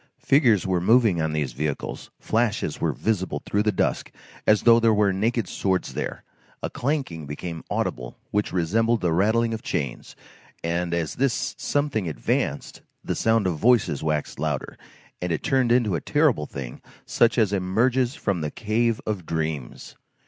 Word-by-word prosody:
Figures 125 - +4
were 90 -2 +1
moving 110 -4 +4
on 80 0 0
these 75 -5 -2
vehicles, 75 +2 -4
flashes 115 -1 -1
were - - +2
visible 105 -4 -2
through 100 - +1
the 105 0 +2
dusk 95 - -1 0.4
as 105 -1 +4
though 115 -1 +7
there 115 -2 +4
were 100 -2 +3
naked 110 +2 0
swords 95 0 -1
there, - - -4 0.4
a - - -2
clanking 125 - -2
became 80 +3 -6
audible 60 0 -3
which 105 0 0
resembled 115 +7 +1
the 85 -3 +1
rattling 110 +6 +2
of 110 - -4
chains, 70 -5 -4 0.5
and 85 +1 -1
as 80 -2 -2
this 135 -1 0
something 140 - -1
advanced, 75 - -2 0.2
the - - -2
sound 115 -2 +2
of 85 -4 -1
voices 115 - +3
waxed 75 -1 -2
louder, - - -2 0.5
and 90 -1 -2
it 80 - -2
turned 130 -3 +2
into 120 -5 +3
a 85 - -1
terrible 145 - +2
thing 65 -3 -7 0.2
such 120 +1 +2
as 105 -4 +3
emerges 120 +7 +1
from 100 - -1
the 75 - -2
cave 115 +5 0
of 105 -4 -2
dreams. 80 -5 -4
100 Hz, 165 wpm, -24 LUFS, 85-115 Hz, 0.5 s, though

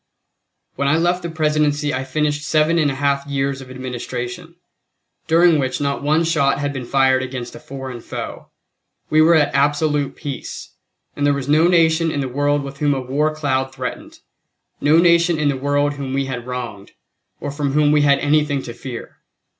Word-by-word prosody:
When 140 - 0
I 150 +3 +3
left 175 +2 +1
the 170 - -4
Presidency 150 -2 0
I 130 +1 -2
finished 150 +2 -1
seven 155 +2 +2
and 150 -2 +2
a 135 - -3
half 140 0 0
years 135 -1 -2
of 130 - -11
administration, 130 +5 -6 0.7
during 165 -1 +5
which 130 -1 -1
not 140 -1 -1
one 155 +3 +2
shot 155 -4 +2
had 145 0 -2
been 130 -3 -6
fired 130 -1 +3
against 125 -2 -6
a - - -10
foreign 130 -3 -8
foe. - - -7 0.6
We 155 - +5
were 165 +2 +6
at 150 -2 +2
absolute 145 0 +1
peace, 140 -3 -7 0.4
and 145 - -3
there 145 0 +3
was 140 -1 -4
no 155 +3 +4
nation 165 -1 +3
in 145 - -2
the 135 - -2
world 145 +2 0
with 140 0 -8
whom 145 -2 +2
a - - -2
war 145 +4 -1
cloud 135 -3 -1
threatened, 130 -1 -6 0.6
no 150 +2 +4
nation 170 0 +4
in 150 -1 +1
the 140 - 0
world 145 +2 0
whom 135 -2 -5
we 135 0 0
had 125 -2 -5
wronged, 120 -6 -6 0.5
or 145 - -4
from 140 -1 -2
whom 150 0 +3
we 150 0 +4
had 140 -1 +4
anything 145 -1 +1
to 120 - -7
fear. 120 -1 -8
145 Hz, 190 wpm, -20 LUFS, 135-155 Hz, 0.7 s, were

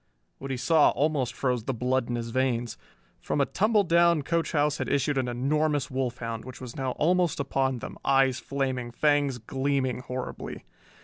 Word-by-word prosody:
What 135 - -6
he 130 - -2
saw 160 +4 +4
almost 140 -2 0
froze 125 -4 -1
the 135 - -2
blood 125 +1 0
in 120 - -1
his 115 -1 -4
veins. 120 -2 0 0.4
From - - -2
a 140 - +4
tumbledown 170 -6 +3
coach 165 +2 0
house 150 0 +1
had - - -2
issued 140 +1 +1
an 130 -2 0
enormous 145 +4 0
wolf 130 -2 -2
hound 115 -1 -5
which 130 +1 -10
was 125 -2 -8
now 130 -2 -2
almost 175 +1 +1
upon 135 -2 0
then, - - -8
eyes 135 -2 +3
flaming, 130 -3 -2
fangs 145 +1 +1
gleaming 130 +2 -1
horribly. 125 0 -6
135 Hz, 175 wpm, -27 LUFS, 125-150 Hz, 0.4 s, saw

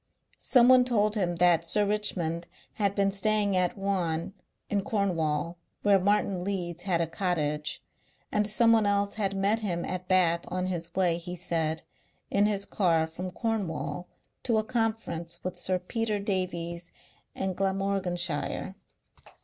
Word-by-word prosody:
Someone 250 0 +6
told 215 -4 +2
him 180 -5 0
that 170 -1 +4
Sir 205 +5 +2
Richmond 175 -5 0 0.3
had 200 -2 0
been 195 -1 +2
staying 205 0 +1
at 180 0 +1
Ruan 185 -3 -1 0.3
in 205 -1 0
Cornwall 170 -6 -1 0.2
where 200 -1 +5
Martin 200 -1 +1
Leeds 175 -3 -3
had 175 -3 +1
a - - +2
cottage, 155 -3 -2 0.5
and 210 0 +2
someone 225 0 +4
else 200 0 +1
had 195 -2 -1
met 200 +3 +2
him 175 -6 -2
at 180 0 -4
Bath 170 -2 +3
on 185 0 -2
his 170 -2 -4
way, 175 -3 +2
he 175 +1 -6
said, 165 -2 -1 0.5
in 205 +1 +3
his 200 -1 -1
car 165 -5 +2
from 170 +3 -6
Cornwall 185 -4 -3 0.3
to 230 -3 +1
a 215 - +2
conference 220 -8 -2
with 185 - -3
Sir 185 -1 0
Peter 215 +4 -2
Davies 175 -4 -3 0.4
in 190 -1 -2
Glamorganshire. 190 -3 -1
185 Hz, 140 wpm, -28 LUFS, 170-205 Hz, 0.5 s, Someone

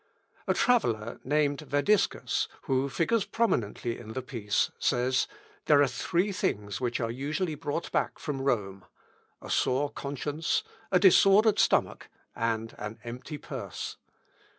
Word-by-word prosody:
A - - +2
traveller 115 - +1
named 145 0 +1
Vadiscus, 155 +8 +1 0.2
who 135 +1 0
figures 200 +10 +1
prominently 120 - -1
in 110 - -9
the 130 - -4
piece, 105 -5 -1
says, 125 +1 +1 0.4
"There 145 -2 +5
are 145 - +6
three 175 +9 0
things 100 - -2
which 120 -1 -1
are 115 -2 -1
usually 150 +7 -2
brought 150 +2 -4
back - - 0
from 145 -4 -4
Rome, 100 -8 -1 0.6
a - - -6
sore 140 +3 +1
conscience, 145 +3 -2 0.3
a 185 - +5
disordered 195 +3 +6
stomach, - - +2 0.3
and 115 -1 -1
an 105 +1 -5
empty 125 +6 -7
purse. - - -6
135 Hz, 130 wpm, -29 LUFS, 115-160 Hz, 0.6 s, are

